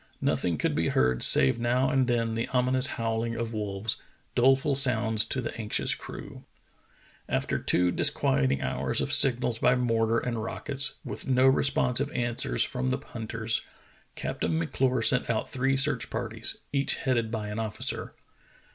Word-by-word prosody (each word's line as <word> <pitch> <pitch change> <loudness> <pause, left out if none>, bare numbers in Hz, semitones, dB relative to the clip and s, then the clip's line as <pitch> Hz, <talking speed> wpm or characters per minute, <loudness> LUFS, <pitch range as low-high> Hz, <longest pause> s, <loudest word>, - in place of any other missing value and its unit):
Nothing 85 -3 0
could - - -1
be - - 0
heard 65 -1 +1
save 65 - +6
now 125 +3 +1
and 135 -2 +1
then 115 -2 0
the 115 +1 -2
ominous 130 +1 +3
howl 115 -1 -1
ing 115 0 -4
of 115 0 -4
wolves, 105 0 -3 0.4
doleful 135 +3 +3
sounds 115 -5 +2
to 130 - -2
the - - -6
anxious 105 - 0
crew. - - -10 0.9
After - - -1
two 90 0 +2
disquieting 65 -4 +1
hours - - -1
of - - -1
signals 125 -3 +3
by 125 - +3
mortar 115 -2 0
and 120 -2 -3
rockets, 140 +4 +1
with - - -7
no 130 0 +3
responsive 135 0 +2
answers 120 - +2
from 130 +1 -3
the 130 - 0
hunters. 115 -3 -4 0.5
Captain 80 - -3
M'Clure 125 +9 -1
sent 125 +2 +2
out 110 -2 -2
three 135 +1 0
search 140 +2 0
parties, 115 -1 -3 0.2
each 140 0 0
headed 120 -4 -1
by 110 -2 -4
an 105 +2 -5
officer. 110 -2 -4
115 Hz, 155 wpm, -27 LUFS, 110-130 Hz, 0.9 s, save